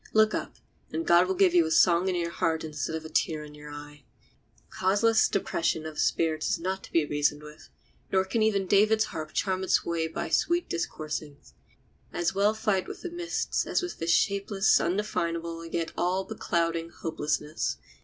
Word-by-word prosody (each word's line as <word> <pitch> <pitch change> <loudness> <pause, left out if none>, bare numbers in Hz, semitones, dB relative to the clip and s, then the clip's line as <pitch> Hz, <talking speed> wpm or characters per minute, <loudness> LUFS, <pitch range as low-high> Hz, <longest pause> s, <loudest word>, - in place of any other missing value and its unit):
Look 215 0 +4
up, - - -4 0.4
and 330 - -3
God 175 +1 +5
will 190 - 0
give 185 -2 +4
you 175 -1 +6
a - - -4
song 175 +2 +4
in 185 - 0
your 170 -1 -1
heart 160 -1 0
instead 155 0 -4
of 160 0 -5
a - - -7
tear 155 -1 0
in 150 0 -11
your 150 0 -11
eye. 145 0 -10 0.7
Causeless 210 +4 +3
depression 165 -4 -1
of 155 -1 -6
spirits 160 -2 +1
is - - 0
not 190 +3 -3
to - - -17
be 165 -2 +3
reasoned 145 0 0
with, 150 +1 -13 0.4
nor 190 0 +3
can 225 +4 -1
even 205 -3 +2
David's 215 +3 +4
harp 155 -6 -6
charm 190 -1 -1
it 190 - +4
away 165 -1 -1
by 160 - -4
sweet 345 0 +1
discoursings. 155 -3 -5 0.6
As 175 - -1
well 205 +2 +2
fight 210 -3 0
with - - -8
the 360 - -5
mists 345 0 -2
as - - 0
with 355 - -5
this 165 - -2
shapeless, 200 +3 +3
undefinable, 170 -3 -2
yet 165 0 -2
all 185 +2 0
beclouding, 170 -5 -1
hopelessness. 150 -2 -2
170 Hz, 185 wpm, -28 LUFS, 160-195 Hz, 0.7 s, you